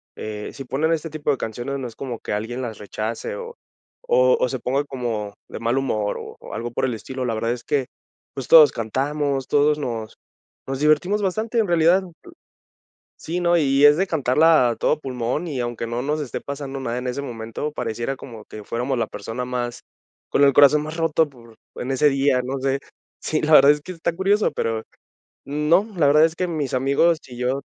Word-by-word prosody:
eh, 105 -1 -6
si 135 - -7
ponen 140 +6 0
este 165 0 -3
tipo 150 -1 -1
de 135 - 0
canciones, 120 +5 -4
no 125 - -4
es 115 - -11
como 125 -4 -6
que - - -4
alguien 115 +5 -3
las 115 -4 -5
rechace, 110 - -4
o 475 0 -8 0.5
o - - +4
o - - +1
se - - -3
ponga 135 +3 0
como 115 -7 -4
de - - -7
mal 115 +3 0
humor 110 -6 -1
o - - -9
o - - -10
algo 120 +1 -4
por 120 - -1
el 125 - -1
estilo. 130 +3 -5
La 115 - -1
verdad 115 +2 -1
es 120 -1 -4
que, 140 -3 0 0.5
pues, 135 -3 -6
todos 155 -3 +8
cantamos, 135 +4 -2
todos 150 +1 +3
nos 115 -6 -5 0.5
nos 135 0 -3
divertimos 155 +8 +2
bastante 220 +5 -1
en 215 - +2
realidad. 170 +2 +4 1.2
Sí, 175 +3 -3
¿no? 175 0 +3
Y 140 -2 +3
es 145 +1 +6
de 190 +2 +1
cantarla 155 -2 +4
a 115 - -3
todo 150 - +1
pulmón, 130 +5 -3
y 140 -5 -4
aunque 120 -1 -3
no 120 +1 -2
nos 150 +2 -1
esté 140 - -4
pasando 140 -1 -5
nada 120 -2 -3
en 125 - -5
ese 135 +3 -3
momento, 115 +3 -5
pareciera 120 0 -3
como 115 -5 -11
que 105 - -10
fuéramos 125 +4 -2
la 115 - 0
persona 115 +5 -5
más 120 -1 -3 0.5
con 140 - +3
el 140 - +5
corazón 145 +2 +6
más 155 +2 -6
roto 165 -1 +2
por 120 -4 -17 0.2
en 130 - -4
ese 140 +3 +4
día, 135 -2 +2
no 135 +2 -3
sé. 135 +1 0 0.4
Sí, 155 - -1
la 155 0 +1
verdad 140 0 +8
es 150 - -3
que 185 - -8
está 170 -1 -2
curioso, 200 +3 +2
pero, 110 -1 -2 0.6
no, 150 +7 +2
la 150 -4 +3
verdad 150 +2 +6
es 165 0 +1
que 180 - -1
mis 150 -6 -3
amigos 140 +6 +3
y 125 - -10
yo, 125 +3 -1
135 Hz, 210 wpm, -22 LUFS, 120-155 Hz, 1.2 s, todos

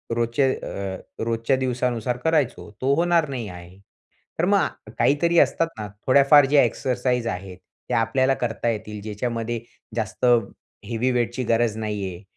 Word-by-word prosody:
रोजचे 120 +3 +1
अ, 95 -1 -5 0.3
रोजच्या 115 +3 +1
दिवसानुसार 125 -2 -1
करायचो, 155 -6 +1
तो 135 +2 +2
होणार 170 -2 +2
नाही 125 -6 -4
आहे. 90 +1 -12 0.6
तर - - +3
मग - - 0
काहीतरी 170 +4 +3
असतात 165 - +3
ना, 105 - -4 0.2
थोड्याफार 140 +2 +7
जे 140 +1 +5
एक्सरसाइज 125 0 -1
आहेत, 95 -2 -5 0.3
त्या 120 -2 +2
आपल्याला 130 +3 +2
करता 115 0 -1
येतील. 105 -1 -4
ज्याच्यामध्ये 115 +2 -3 0.4
जास्त 110 +2 -2 0.6
हेवी 120 +2 0
वेट 120 0 -1
गरज 115 -1 +2
नाही 105 -2 -3
आहे. 90 +3 -10
120 Hz, 140 wpm, -23 LUFS, 110-130 Hz, 0.6 s, थोड्याफार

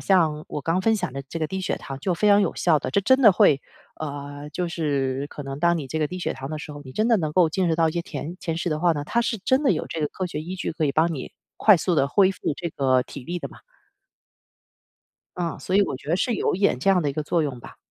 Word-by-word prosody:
像 160 -5 +2
我 150 - -4
刚 165 +5 0
分 225 +3 +3
享 210 - -2
的 140 - -4
这 165 - -5
个 155 - -1
低 190 +2 -4
血 - - -1
糖 135 -1 -7
就 180 +5 0
非 210 +5 +2
常 205 0 +6
有 - - -1
效 160 -4 +3
的。 130 - -4
这 200 - +2
真 260 +7 +3
的 215 - +8
会 140 -6 +4 0.4
呃， 145 -1 -6
就 175 +3 -2
是 140 -4 -1
可 145 - -7
能 135 0 -6
当 170 +1 +2
你 140 - -5
这 160 - -2
个 155 - +1
低 180 +4 -6
血 - - -2
糖 135 +1 -7
的 155 - -4
时 150 - -8
候， 145 - -9
你 130 - -10
真 215 - +1
的 230 - +5
能 155 -5 -2
够 175 -1 +4
进 185 +2 0
食 160 - +2
到 165 -1 +3
一 155 - -2
些 170 - -2
甜 160 +2 -6
甜 165 -2 -3
食 175 - -2
的 155 -1 -1
话 175 0 +3
呢， 145 -2 -4
它 235 - +1
是 230 -1 -1
真 260 +9 +1
的 265 - +4
有 155 - -2
这 165 - -4
个 150 - +1
科 185 - -4
学 155 -3 -5
依 180 +3 -6
据 185 - -3
可 160 -1 -1
以 140 - +1
帮 165 +3 +2
你 130 - -7 0.3
快 210 -3 +7
速 175 +2 0
地 140 -3 +2
恢 190 +5 +4
复 150 - -3
这 170 -1 -4
个 130 -3 +2
体 135 +1 -10
力 175 +4 -3
的 - - -5
嘛。 - - -16 1.8
嗯， 170 -2 -3
所 185 - 0
以 205 - +6
我 135 - -2
觉 140 - -13
得 170 - +2
是 235 +5 0
有 - - 0
一 180 - -3
点 200 -10 +2
这 195 - +2
样 190 -2 +4
的 145 - 0
一 - - -2
个 155 - -2
作 165 +2 +1
用 140 -5 -3
吧。 - - -12
165 Hz, 320 characters per minute, -24 LUFS, 145-185 Hz, 1.8 s, 的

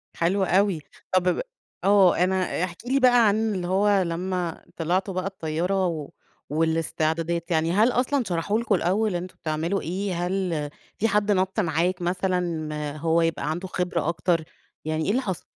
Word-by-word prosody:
حلو 190 +4 +1
أوي. 190 -2 +2 0.3
طب 185 -1 +4
ب - - 0 0.4
آه 195 -2 +5
أنا 185 0 +1
احكِ 175 -2 -4
لي 270 +2 +2
بقى 245 -3 +6
عن 215 +1 +1
اللي 175 -1 -3
هو 200 +1 +3
لمّا 175 0 -3
طلعتوا 180 +4 0
بقى 185 +1 -2
الطيارة 180 +1 -1
و 155 -4 -4 0.4
والاستعدادات، 165 +2 0
يعني 165 +1 +2
هل 220 +6 +4
أصلًا 260 +2 +1
شرحوا 185 +5 0
لكم 225 -4 +1
الأول 195 +2 +1
أنتم 180 +1 -5
بتعملوا 160 +5 -1
إيه؟ 185 +2 -3
هل 175 -6 -1 0.3
في 225 - +2
حد 210 0 +2
نَط 190 +2 +1
معاك 175 +1 0
مثلًا 170 -5 -2
هو 165 +2 +2
يبقى 165 -1 0
عنده 175 +4 -4
خبرة 180 -3 -1
أكتر؟ 170 -1 +1 0.4
يعني 155 0 -1
إيه 200 - +1
اللي 255 +4 +1
حصل؟ 190 - -4
180 Hz, 160 wpm, -25 LUFS, 165-195 Hz, 0.4 s, بقى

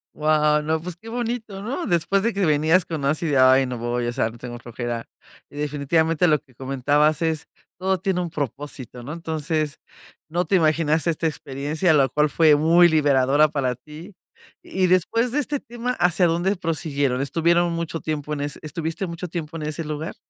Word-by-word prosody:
Guau, 150 0 +2
no, 160 +1 0
pues, 180 0 -6
qué 200 +6 -16
bonito, 225 -4 -4
¿no?, 265 - -3
después 195 +1 +1
de 230 0 +1
que 200 -1 -1
venías 155 +4 +3
con 155 -5 -4
así: 155 +1 0
"Ay, 130 0 +5
no 125 -1 -4
voy, 120 +1 -2
o 120 - -2
sea, 120 -3 0
no, 120 - -14
tengo 120 0 -7
flojera". 120 -1 -5 0.4
Y - - -15
definitivamente 150 +3 +1
lo 150 -2 +3
que 130 -5 -27
comentabas 140 +4 +1
es 160 -2 -1 0.3
todo 190 0 0
tiene 190 -1 -1
un 175 -2 -3
propósito, 135 -3 -6
¿no?, 145 +5 -6
entonces, 155 -2 -3 0.5
no 175 +3 -1
te 190 - +1
imaginas 155 -1 +2
esta 165 -1 0
experiencia, 150 +3 -1
la 140 -3 +4
cual 150 +4 +2
fue 155 -1 +5
muy 170 +3 +5
liberadora 145 -1 +3
para 130 -4 -1
ti. 155 - -12 0.5
Y 185 -1 0
después 230 +7 +2
de 290 - 0
este 290 0 -2
tema, 240 +1 -4
¿hacia 175 +1 +3
dónde 175 +4 +1
prosiguieron? 145 -6 -1
¿Estuvieron 170 +5 +2
mucho 165 -1 -3
tiempo 150 -1 -3
en 145 - -3
ese 145 0 -4
estuviste 165 +4 -4
mucho 170 +1 -6
tiempo 165 -1 -5
en 155 - -5
ese 155 +2 -3
lugar? 155 +1 -5
155 Hz, 185 wpm, -23 LUFS, 145-175 Hz, 0.5 s, Ay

